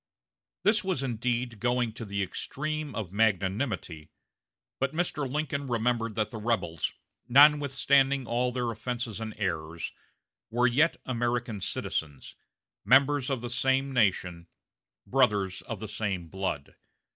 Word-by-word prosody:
This 210 Hz, +2 st, +4 dB
was 185 Hz, -8 st, -1 dB
indeed 120 Hz, -1 st, -1 dB
going 120 Hz, -1 st, +1 dB
to 115 Hz, 0 st, -7 dB
the 100 Hz, -1 st, -1 dB
extreme 155 Hz, +9 st, -4 dB
of 100 Hz, -6 st, -4 dB
magnanimity; 95 Hz, -, 0 dB, 0.7 s
but 135 Hz, +3 st, -1 dB
Mr. 150 Hz, -6 st, -1 dB
Lincoln 145 Hz, -1 st, -2 dB
remembered 115 Hz, -2 st, 0 dB
that 110 Hz, -1 st, -1 dB
the 110 Hz, -, -6 dB
rebels, 95 Hz, -9 st, -1 dB, 0.4 s
notwithstanding 140 Hz, -1 st, +5 dB
all 125 Hz, +1 st, +1 dB
their 120 Hz, -2 st, -1 dB
offenses 115 Hz, 0 st, -4 dB
and 110 Hz, -1 st, -5 dB
errors, 85 Hz, -4 st, -3 dB, 0.6 s
were 120 Hz, +2 st, +2 dB
yet 145 Hz, +7 st, +3 dB
American 120 Hz, -3 st, -1 dB
citizens, 75 Hz, -6 st, -4 dB, 0.5 s
members 135 Hz, +4 st, +4 dB
of 135 Hz, -4 st, -1 dB
the 120 Hz, -, -4 dB
same 135 Hz, +2 st, +1 dB
nation, 90 Hz, -7 st, +1 dB, 0.6 s
brothers 105 Hz, -8 st, +2 dB
of 115 Hz, -4 st, -6 dB
the 110 Hz, -, -5 dB
same 95 Hz, -5 st, -3 dB
blood. 95 Hz, -7 st, -3 dB
120 Hz, 125 wpm, -29 LUFS, 100-135 Hz, 0.7 s, notwithstanding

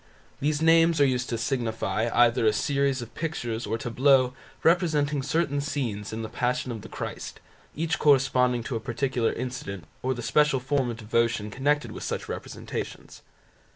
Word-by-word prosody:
These 150 Hz, +2 st, 0 dB
names 165 Hz, 0 st, +5 dB
are 140 Hz, -, +6 dB
used 125 Hz, -2 st, 0 dB
to 115 Hz, -, -1 dB
signify 115 Hz, -3 st, -1 dB
either 120 Hz, -1 st, +4 dB
a 110 Hz, -, +4 dB
series 140 Hz, +2 st, 0 dB
of 115 Hz, -, -12 dB
pictures 120 Hz, -9 st, -3 dB
or 110 Hz, +2 st, -1 dB
tableaux 125 Hz, +2 st, +3 dB, 0.3 s
representing 155 Hz, -4 st, +2 dB
certain 145 Hz, 0 st, 0 dB
scenes 125 Hz, -9 st, -3 dB
in 110 Hz, +1 st, -4 dB
the -, -, -3 dB
Passion 125 Hz, +2 st, -1 dB
of 110 Hz, -2 st, -5 dB
Christ, -, -, -6 dB, 0.4 s
each 160 Hz, +2 st, -1 dB
corresponding 130 Hz, -4 st, +3 dB
to 120 Hz, -, -4 dB
a -, -, -1 dB
particular 120 Hz, 0 st, -1 dB
incident, 125 Hz, -7 st, -5 dB, 0.2 s
or 130 Hz, 0 st, 0 dB
the 120 Hz, -, -6 dB
special 150 Hz, -1 st, +3 dB
form 135 Hz, 0 st, 0 dB
of 115 Hz, -, -5 dB
devotion 115 Hz, -1 st, 0 dB
connected 145 Hz, +5 st, 0 dB
with -, -, -8 dB
such -, -, -3 dB
representations. -, -, -6 dB
125 Hz, 160 wpm, -26 LUFS, 115-145 Hz, 0.4 s, are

